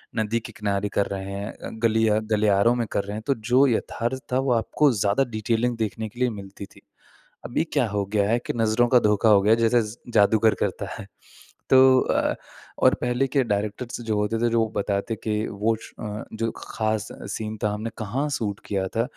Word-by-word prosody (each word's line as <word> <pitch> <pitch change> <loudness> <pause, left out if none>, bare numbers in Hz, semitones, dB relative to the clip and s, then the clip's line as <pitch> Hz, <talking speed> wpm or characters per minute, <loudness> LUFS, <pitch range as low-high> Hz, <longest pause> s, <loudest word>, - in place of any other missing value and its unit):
नदी 110 +1 0
के 110 - -10
किनारे 100 -1 -1
कर 100 - +2
रहे 95 0 -5
हैं 100 +2 -5
अ, - - -9
गली 110 0 +3
या 105 0 +3
गलियारों 105 +2 +3
में 120 -2 -1
कर 100 - 0
रहे 100 +1 -6
हैं, 110 - -5
तो 140 - +2
जो 125 +5 +3
यथार्थ 120 +2 -2
था 130 - +2
वो 135 -1 0
आपको 135 +5 +2
ज़्यादा 105 +2 +1
डिटेलिंग 115 +2 0
देखने 110 0 -3
के 120 +4 -15
लिए 125 - +2
मिलती 100 -2 -8
थी। - - -20 0.6
अभी 140 - 0
क्या 140 -5 +2
हो 100 -1 -1
गया 100 0 0
है 115 - +3
कि - - -2
नज़रों 115 +1 +2
का 125 -1 +6
धोखा 105 +1 +3
हो 100 -2 +6
गया 110 +3 +4
जैसे 115 +1 +3
स 105 +2 -8 0.2
जादूगर 110 +1 +4
करता - - -2
है - - -8 0.6
तो 130 0 +7
अ, - - 0 0.4
और - - +5
पहले 125 +2 +1
के 135 +1 +1
डायरेक्टर्स 105 +3 -3
जो 110 -2 -1
होते 105 +2 0
थे 120 0 +2
जो 115 -1 +2
बताते 100 +2 -1
कि 105 0 -1
वो 110 +2 0
श - - -12
अ, 105 -1 -5
जो 115 +1 -1
खास 110 -1 -2 0.2
सीन 110 0 -4
था 105 - +2
हमने 110 +2 -4
कहाँ 125 +7 -2
शूट 105 -8 -2
किया 95 -2 -1
था, 115 +4 -1
110 Hz, 210 wpm, -24 LUFS, 105-120 Hz, 0.6 s, तो